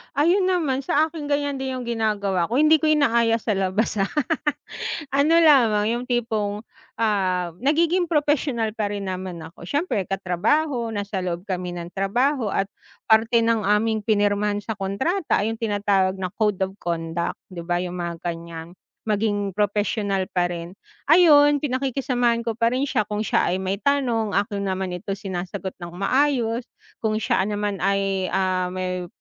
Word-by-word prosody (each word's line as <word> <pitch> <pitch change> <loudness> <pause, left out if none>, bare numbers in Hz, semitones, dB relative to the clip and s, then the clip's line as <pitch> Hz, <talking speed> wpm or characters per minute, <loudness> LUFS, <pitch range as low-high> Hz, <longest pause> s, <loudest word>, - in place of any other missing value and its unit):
Ayun 350 +6 +3
naman 320 -8 +1
sa 290 +3 +2
akin 310 -3 -6
ganyan 285 -1 -1
din 265 -1 -3
yung 255 - -4
ginagawa 210 -6 0
ko, 235 - -3
hindi 310 +3 +5
ko 315 - +1
inaaya 235 -7 +3
sa 230 -1 -2
labas, 195 +2 0
ah. 195 - +2 1.0
Ano 285 +4 +3
lamang 225 -8 +5
yung 240 +1 -2
tipong, 220 -4 -1 0.3
ah, 185 -5 0
nagiging 335 +6 +2
propesyonal 290 -7 +1
pa 215 -1 -2
rin 195 -2 -3
naman 185 -2 -6
ako. 165 +1 -11
Siyempre 285 - -1
katrabaho, 230 - 0
nasa 205 -2 -3
loob 175 -1 -3
kami 180 -3 -4
ng 175 0 -7
trabaho. 240 +7 0
At 195 0 -1 0.4
parte 230 +1 +4
ng 230 0 +2
aming 215 +1 +1
pinirmahan 205 -1 +1
sa 220 - -4
kontrata 265 - 0
ay 220 - 0
yung 225 - -6
tinatawag 205 -3 +1
na 185 -2 -4
code 210 -3 0
of 190 - -2
conduct, 170 0 -2 0.2
'di 180 - -7
ba? 175 - +1
Yung 180 0 -5
mga 170 -1 -5
ganyan. 170 -1 -6 0.4
Maging 205 -2 0
propesyonal 205 -2 0
pa 175 -1 +2
rin. 170 +1 -6 0.3
Ayun, 290 -3 +6
pinakikisamahan 255 -3 0
ko 230 -1 -4
pa 230 +1 +2
rin 260 - 0
siya 215 -7 0
kung 210 0 -2
siya - - +1
ay 180 - +1
may 190 +1 -2
tanong 240 -6 0
akin 200 0 0
naman, 190 -1 -2
ito 180 +2 -4
sinasagot 190 -1 -5
ng 175 -1 -8
maayos. 240 +2 +1 0.3
Kung 220 -1 0
siya 215 - 0
naman 205 -1 -2
ay, 195 -1 0
ah, 185 -1 +1
may 180 -1 -3
210 Hz, 160 wpm, -23 LUFS, 190-255 Hz, 1.0 s, Ayun